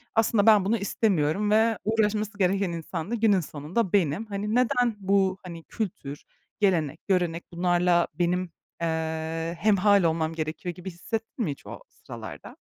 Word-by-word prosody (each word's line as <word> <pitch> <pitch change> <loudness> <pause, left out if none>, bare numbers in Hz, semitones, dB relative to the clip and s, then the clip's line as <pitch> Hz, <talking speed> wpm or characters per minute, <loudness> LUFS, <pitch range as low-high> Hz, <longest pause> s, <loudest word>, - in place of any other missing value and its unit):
"Aslında 225 -2 +3
ben 210 -4 +6
bunu 225 +4 +2
istemiyorum 200 -2 0
ve 220 +1 +3
uğraşması 215 -1 0
gereken 195 -1 +1
insan 170 +3 -5
da - - +1
günün 215 -4 +3
sonunda 170 +6 -3
benim." 185 +1 +2
Hani, 210 +1 -3
"Neden 245 -1 +2
bu, 190 -1 +2
hani, 170 -3 -8
kültür, 155 -10 -5 0.4
gelenek, 170 -8 0
görenek 175 -3 0
bunlarla 175 0 +2
benim, 180 0 0 0.3
eee, 160 0 -2
hemhâl 205 -1 +4
olmam 160 -1 +1
gerekiyor?" 160 +2 -4
gibi 180 +1 -7
hissettin 225 +6 -4
mi 155 - -1
hiç 140 - -10
o - - -8
sıralarda? - - -10
185 Hz, 145 wpm, -26 LUFS, 165-210 Hz, 0.4 s, ben